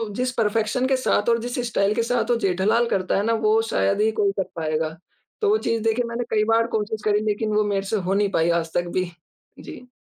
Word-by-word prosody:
जिस 250 Hz, 0 st, -1 dB
परफेक्शन 225 Hz, +4 st, +1 dB
के 265 Hz, -, +2 dB
साथ 235 Hz, -3 st, +1 dB
और 230 Hz, -, +4 dB
जिस 245 Hz, +2 st, -4 dB
स्टाइल 205 Hz, -2 st, +1 dB
के 230 Hz, -, +1 dB
साथ 245 Hz, 0 st, -1 dB
वो -, -, +4 dB
जेठालाल 205 Hz, +5 st, +1 dB
करता 185 Hz, 0 st, 0 dB
है 200 Hz, -, +1 dB
ना 230 Hz, -, +2 dB
वो 220 Hz, +1 st, +4 dB
शायद 100 Hz, -, +1 dB
ही 220 Hz, +1 st, +3 dB
कोई 200 Hz, -1 st, +3 dB
कर 190 Hz, -, -2 dB
पाएगा 155 Hz, -1 st, -1 dB, 0.5 s
तो 420 Hz, -, +2 dB
वो 430 Hz, -, +4 dB
चीज़ 230 Hz, -1 st, 0 dB
देखें 225 Hz, +2 st, +1 dB
मैंने 235 Hz, +1 st, -3 dB
कई 215 Hz, -1 st, +2 dB
बार 230 Hz, 0 st, +3 dB
कोशिश 215 Hz, 0 st, -4 dB
करी, 210 Hz, -1 st, +3 dB
लेकिन 215 Hz, 0 st, -1 dB
वो 215 Hz, -, +3 dB
मेरे 200 Hz, -1 st, 0 dB
से 220 Hz, -, -1 dB
हो 190 Hz, -1 st, -1 dB
नहीं 200 Hz, 0 st, +2 dB
पाई 165 Hz, -1 st, +1 dB
आज 165 Hz, 0 st, -10 dB
तक 175 Hz, 0 st, 0 dB
भी, 185 Hz, -1 st, -1 dB, 0.5 s
जी। 250 Hz, 0 st, -11 dB
215 Hz, 240 wpm, -23 LUFS, 195-230 Hz, 0.5 s, और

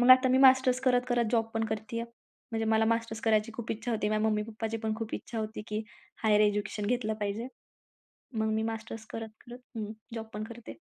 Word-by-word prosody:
मग 245 Hz, +1 st, +6 dB
आता 255 Hz, 0 st, +9 dB
मी 260 Hz, -, +4 dB
मास्टर्स 260 Hz, -1 st, +6 dB
करत-करत 245 Hz, -2 st, +2 dB
जॉब 230 Hz, -2 st, +3 dB
पण 225 Hz, 0 st, +1 dB
करतीये. 220 Hz, +1 st, -3 dB, 0.5 s
म्हणजे 225 Hz, -1 st, -1 dB
मला 220 Hz, 0 st, +4 dB
मास्टर्स 230 Hz, 0 st, 0 dB
करायची 220 Hz, 0 st, +2 dB
खूप 235 Hz, -2 st, -5 dB
इच्छा 225 Hz, +2 st, -3 dB
होती. 210 Hz, -1 st, 0 dB
माझ्या 215 Hz, +1 st, +2 dB
मम्मी-पप्पाची 220 Hz, +1 st, -2 dB
पण 220 Hz, 0 st, +1 dB
खूप 225 Hz, -1 st, -4 dB
इच्छा 230 Hz, -, -5 dB
होती 215 Hz, 0 st, -4 dB
की 215 Hz, +1 st, -2 dB, 0.4 s
हायर 210 Hz, -1 st, +5 dB
एज्युकेशन 210 Hz, 0 st, +1 dB
घेतलं 225 Hz, -1 st, 0 dB
पाहिजे. 210 Hz, +5 st, -2 dB, 0.9 s
मग 220 Hz, 0 st, +2 dB
मी 220 Hz, 0 st, +1 dB
मास्टर्स 225 Hz, 0 st, -4 dB
करत-करत 225 Hz, +2 st, -8 dB, 0.2 s
हं, 215 Hz, -1 st, -3 dB, 0.2 s
जॉब 225 Hz, -1 st, -4 dB
पण 210 Hz, +1 st, -3 dB
करते. 230 Hz, +1 st, -8 dB
225 Hz, 190 wpm, -30 LUFS, 215-235 Hz, 0.9 s, आता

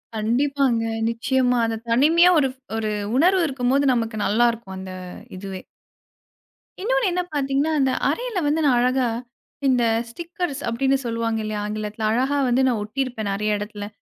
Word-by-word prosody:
கண்டிப்பாங்க, 245 Hz, +2 st, +1 dB, 0.3 s
நிச்சயமா. 250 Hz, +1 st, +1 dB
அந்த 225 Hz, -, -1 dB
தனிமையா 320 Hz, +9 st, +5 dB
ஒரு, 270 Hz, -, +3 dB, 0.3 s
ஒரு 220 Hz, -1 st, -1 dB, 0.3 s
உணர்வு 365 Hz, +5 st, +4 dB
இருக்கும்போது 265 Hz, 0 st, +1 dB
நமக்கு 225 Hz, -2 st, -1 dB
நல்லா 235 Hz, +4 st, +3 dB
இருக்கும். 220 Hz, -5 st, -9 dB
அந்த 190 Hz, -1 st, -7 dB, 0.4 s
இதுவே. 190 Hz, -1 st, -6 dB, 1.2 s
இன்னொன்னு -, -, +1 dB
என்ன 360 Hz, +1 st, 0 dB
பார்த்தீங்கன்னா, 280 Hz, +2 st, 0 dB
அந்த 265 Hz, -1 st, +2 dB, 0.2 s
அறையில 485 Hz, -5 st, -2 dB
வந்து 305 Hz, +2 st, +1 dB
நான் 255 Hz, -3 st, +4 dB
அழகா, 255 Hz, 0 st, +2 dB, 0.6 s
இந்த 250 Hz, -2 st, +3 dB, 0.3 s
ஸ்டிக்கர்ஸ் 335 Hz, 0 st, -5 dB
அப்பிடின்னு 265 Hz, +4 st, +1 dB
சொல்லுவாங்க 230 Hz, -1 st, -1 dB
இல்லயா! 210 Hz, -1 st, -3 dB
ஆங்கிலத்துல. 215 Hz, +1 st, -4 dB
அழகா 265 Hz, +5 st, +1 dB
வந்து 245 Hz, +2 st, +3 dB
நான் 235 Hz, -4 st, +1 dB
ஒட்டிருப்பேன் 220 Hz, -2 st, -3 dB
நிறைய 210 Hz, +1 st, 0 dB
இடத்துல. 205 Hz, 0 st, -6 dB
245 Hz, 140 wpm, -23 LUFS, 220-280 Hz, 1.2 s, தனிமையா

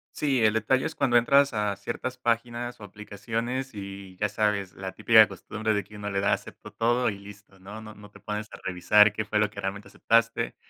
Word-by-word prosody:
Sí, 135 Hz, -5 st, +1 dB
el 110 Hz, 0 st, +4 dB
detalle 120 Hz, +4 st, +1 dB
es 160 Hz, -, -5 dB
cuando 125 Hz, -4 st, +2 dB
entras 140 Hz, +3 st, +4 dB
a 105 Hz, -1 st, 0 dB
ciertas 125 Hz, +5 st, -5 dB
páginas 120 Hz, 0 st, -2 dB
o -, -, -9 dB
aplicaciones 115 Hz, +6 st, -5 dB
y 100 Hz, -2 st, -9 dB
ya 105 Hz, +1 st, 0 dB
sabes, 105 Hz, -2 st, -1 dB
la 95 Hz, 0 st, -6 dB
típica 110 Hz, 0 st, +6 dB
costumbre 110 Hz, +3 st, -3 dB
de 100 Hz, -2 st, -1 dB
que 105 Hz, -, -14 dB
uno 105 Hz, 0 st, -5 dB
le 100 Hz, -, -2 dB
da, 100 Hz, -, +2 dB
acepto -, -, -5 dB
todo 120 Hz, +2 st, +1 dB
y 100 Hz, -, -8 dB
listo, 100 Hz, -1 st, -14 dB
¿no? 105 Hz, +3 st, -9 dB
No 110 Hz, -1 st, -11 dB
no 105 Hz, 0 st, -14 dB
te -, -, -16 dB
pones 105 Hz, 0 st, -5 dB
a -, -, -9 dB
revisar 95 Hz, +3 st, +4 dB
qué 110 Hz, -, -3 dB
fue 105 Hz, 0 st, -1 dB
lo 105 Hz, -1 st, +2 dB
que 100 Hz, -, -8 dB
realmente 100 Hz, +1 st, -5 dB
aceptaste. 115 Hz, +3 st, +1 dB
105 Hz, 220 wpm, -26 LUFS, 100-115 Hz, -, típica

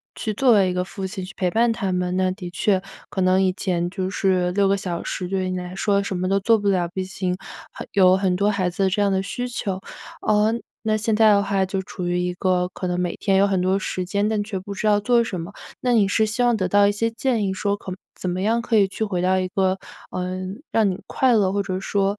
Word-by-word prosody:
去 215 Hz, -, -3 dB
作 245 Hz, +2 st, +4 dB
为 195 Hz, -3 st, +4 dB
一 -, -, -2 dB
个 180 Hz, 0 st, -1 dB
父 190 Hz, +1 st, -6 dB
亲 190 Hz, -1 st, -5 dB
去 185 Hz, -, -10 dB
陪 180 Hz, -2 st, 0 dB
伴 230 Hz, +3 st, +3 dB
他 200 Hz, -4 st, -2 dB
们， 180 Hz, 0 st, -1 dB
那 185 Hz, 0 st, +1 dB
的 185 Hz, -2 st, -7 dB
确 185 Hz, +2 st, +1 dB, 0.3 s
可 -, -, -5 dB
能 185 Hz, +1 st, +3 dB
以 185 Hz, -, +3 dB
前 175 Hz, -2 st, -1 dB
就 185 Hz, 0 st, -3 dB
是 185 Hz, -2 st, +1 dB
6 200 Hz, 0 st, +3 dB
个 200 Hz, -, +2 dB
小 180 Hz, -3 st, -4 dB
时 180 Hz, -, -4 dB
对 190 Hz, +1 st, -1 dB
于 185 Hz, -, -2 dB
你 185 Hz, -, -2 dB
来 180 Hz, 0 st, -6 dB
说 200 Hz, 0 st, +1 dB
什 200 Hz, -1 st, -3 dB
么 185 Hz, +1 st, -1 dB
都 195 Hz, +1 st, +2 dB
做 225 Hz, +3 st, +4 dB
不 205 Hz, -1 st, 0 dB
了， 180 Hz, -3 st, +1 dB
毕 185 Hz, +2 st, -4 dB
竟 185 Hz, -1 st, -3 dB, 0.6 s
有 185 Hz, -1 st, +5 dB
很 190 Hz, -2 st, +1 dB
多 200 Hz, +1 st, +2 dB
孩 195 Hz, -3 st, 0 dB
子 190 Hz, +2 st, 0 dB
这 205 Hz, +2 st, 0 dB
样 200 Hz, -1 st, +2 dB
的 190 Hz, 0 st, +1 dB
需 245 Hz, +6 st, -4 dB
求， 195 Hz, -5 st, -3 dB, 0.4 s
呃 215 Hz, +1 st, +3 dB, 0.3 s
那 215 Hz, 0 st, +2 dB
现 215 Hz, 0 st, 0 dB
在 220 Hz, 0 st, +6 dB
的 200 Hz, -1 st, +5 dB
话 195 Hz, -1 st, 0 dB
就 190 Hz, 0 st, -2 dB
处 180 Hz, -1 st, -6 dB
于 175 Hz, -, 0 dB
一 180 Hz, 0 st, -1 dB
个 180 Hz, 0 st, +1 dB
可 185 Hz, -, -4 dB
能 180 Hz, 0 st, -1 dB
每 180 Hz, -1 st, -1 dB
天 195 Hz, -2 st, +1 dB
有 200 Hz, -, +4 dB
很 190 Hz, -2 st, +1 dB
多 190 Hz, +2 st, +1 dB
时 185 Hz, -1 st, -3 dB
间， 200 Hz, +3 st, 0 dB
但 215 Hz, -1 st, 0 dB
却 200 Hz, -2 st, -4 dB
不 200 Hz, +2 st, -7 dB
知 200 Hz, -, -4 dB
道 210 Hz, -1 st, +4 dB
做 235 Hz, +2 st, +3 dB
什 190 Hz, -6 st, -4 dB
么。 165 Hz, -, -6 dB, 0.3 s
那 250 Hz, -1 st, +1 dB
你 205 Hz, -4 st, +4 dB
是 220 Hz, +2 st, +3 dB
希 215 Hz, +3 st, -1 dB
望 240 Hz, -2 st, +3 dB
得 185 Hz, -3 st, 0 dB
到 205 Hz, +2 st, +4 dB
一 -, -, +3 dB
些 230 Hz, +3 st, 0 dB
建 230 Hz, -2 st, 0 dB
议 190 Hz, -, -1 dB
说 200 Hz, +1 st, -1 dB
可 185 Hz, -2 st, -7 dB, 0.3 s
怎 180 Hz, -, -2 dB
么 180 Hz, +1 st, -2 dB
样 225 Hz, +4 st, +1 dB
可 230 Hz, -, -1 dB
以 205 Hz, -2 st, +6 dB
去 220 Hz, +3 st, -2 dB
回 185 Hz, -4 st, -2 dB
到 185 Hz, +1 st, +2 dB
一 185 Hz, -, -1 dB
个， 190 Hz, 0 st, 0 dB, 0.3 s
呃 185 Hz, 0 st, -3 dB, 0.3 s
让 215 Hz, -3 st, +3 dB
你 185 Hz, -, -4 dB
快 260 Hz, -1 st, +2 dB
乐， 195 Hz, -3 st, +2 dB
或 200 Hz, 0 st, 0 dB
者 185 Hz, -1 st, -3 dB
说， 200 Hz, +1 st, 0 dB
195 Hz, 285 characters per minute, -22 LUFS, 185-210 Hz, 0.6 s, 在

